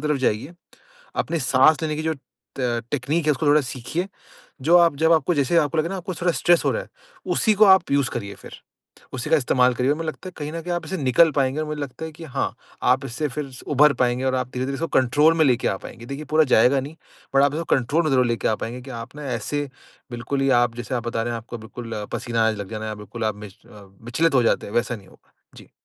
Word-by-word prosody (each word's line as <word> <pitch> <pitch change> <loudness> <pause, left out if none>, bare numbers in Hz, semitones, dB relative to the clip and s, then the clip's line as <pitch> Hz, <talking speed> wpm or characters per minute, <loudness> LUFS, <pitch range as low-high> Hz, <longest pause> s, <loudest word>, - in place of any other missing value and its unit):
तरफ 150 - +2
जाइए, 120 +11 -2 0.6
अपनी 170 - -1
साँस 135 +5 +4
लेने 155 -1 -1
की 155 - -3
जो 160 0 -1
त - - -17 0.7
टेक्निक 150 +4 -1
है - - +5
उसको 150 +1 -1
थोड़ा 150 +1 +5
सीखिए। 130 +7 -4 0.6
जो 170 +5 +5
आप 170 -3 +5
जब 160 +1 +4
आपको 160 +2 +2
जैसे 145 +4 +1
आपको 155 -1 +2
लगे 155 +2 +1
ना 195 - -4
आपको 185 0 -5
थोड़ा 175 +1 0
स्ट्रेस 175 +1 +3
हो - - +3
रहा - - -2
है, - - -14 0.4
उसी 220 - +2
को 210 +1 +6
आप 190 -2 +7 0.2
उसे 130 -3 0
करिए 100 -4 -5
फिर। - - -13 0.6
उसी 130 +4 -4
का 160 - +6
इस्तेमाल 125 -2 +2
करिए 125 +3 +1
और 150 - +1
मुझे 165 - -5
लगता 170 +4 -6
है - - -10
कहीं 150 0 -5
न 165 - -4
कहीं 175 +1 -2
आप 175 - -3
इससे 190 - -3
निकल 145 +3 +4
पाएँगे 135 +1 +1
और 155 - -2
मुझे 150 0 -4
लगता 145 +2 -6
है 160 - -7
कि 165 +2 -11
हाँ, 140 - -3 0.3
आप - - +3
इससे 145 +6 -3
फिर 140 +1 -5 0.2
उभर 150 +1 +5
पाएँगे 125 +1 0
और 130 0 +1
आप 130 -1 -2
धीरे-धीरे 130 +2 -2
इसको 165 +4 -2
कंट्रोल 145 +6 +4
में 160 - +4
लेके 125 -4 +2
आ - - -1
पाएँगे। 115 +4 -11
देखिए 140 +4 -6
पूरा 160 - +6
जाएगा 130 0 +4
नहीं, 140 +4 -8 0.4
बट 135 - +6
आप 140 0 +3
इसको 165 +2 -2
कंट्रोल 140 +6 +1
में 155 - +1
ज़रूर 130 -2 +3
लेके 120 -1 0
आ 110 - +2
पाएँगे 120 +2 -5
कि 135 - -11
आप 115 - -13
ना 150 - -7
ऐसे, 145 +5 -2 0.4
बिल्कुल 120 +3 -3
ही 135 0 +2
आप 120 -1 0
जैसे 120 +2 -4
आप 120 -1 -3
बता 115 -1 -1
रहे 120 - -2
हैं 115 - -3
आपको 115 +1 -8
बिल्कुल, 115 +1 -8 0.2
पसीना 115 -1 0
आने 110 - 0
लग 100 -1 -7
जाना 110 -1 -5
या 110 - -4
बिल्कुल 105 +2 -7
आप 110 -1 -1
विच 105 -2 -11
अ, 105 -1 -14 0.2
विचलित 145 +6 +1
हो 125 - +5
जाते 115 - +1
हैं, 100 - -9
वैसा 120 0 0
नहीं 95 -3 -16
होगा। - - -23 0.2
जी। - - -15
135 Hz, 260 wpm, -23 LUFS, 120-155 Hz, 0.7 s, आप